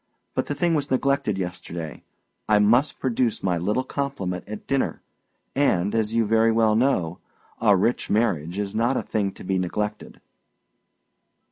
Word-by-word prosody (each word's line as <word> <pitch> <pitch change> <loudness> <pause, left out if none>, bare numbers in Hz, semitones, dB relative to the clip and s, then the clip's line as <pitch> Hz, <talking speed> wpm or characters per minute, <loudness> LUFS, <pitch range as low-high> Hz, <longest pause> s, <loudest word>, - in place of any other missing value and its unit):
But - - -1
the 145 - -2
thing 170 +2 +1
was 145 -2 0
neglected 135 -5 +1
yesterday; 90 -3 -5 0.5
I 105 - +6
must 120 +8 +3
produce 125 -3 0
my 90 -3 +1
little 105 +9 0
compliment 130 -12 -3
at 105 0 -7
dinner; 135 -1 -1 0.5
and, 105 -9 +2
as 110 -1 +1
you 115 0 +2
very 115 +1 +3
well 110 -1 +3
know, 95 -9 +1 0.4
a 105 -4 +5
rich 115 +6 0
marriage 95 -6 0
is 100 -1 -2
not 120 +4 +1
a - - -1
thing 100 -3 -1
to - - -11
be 95 0 0
neglected." 105 +4 -3
110 Hz, 155 wpm, -24 LUFS, 95-130 Hz, 0.5 s, I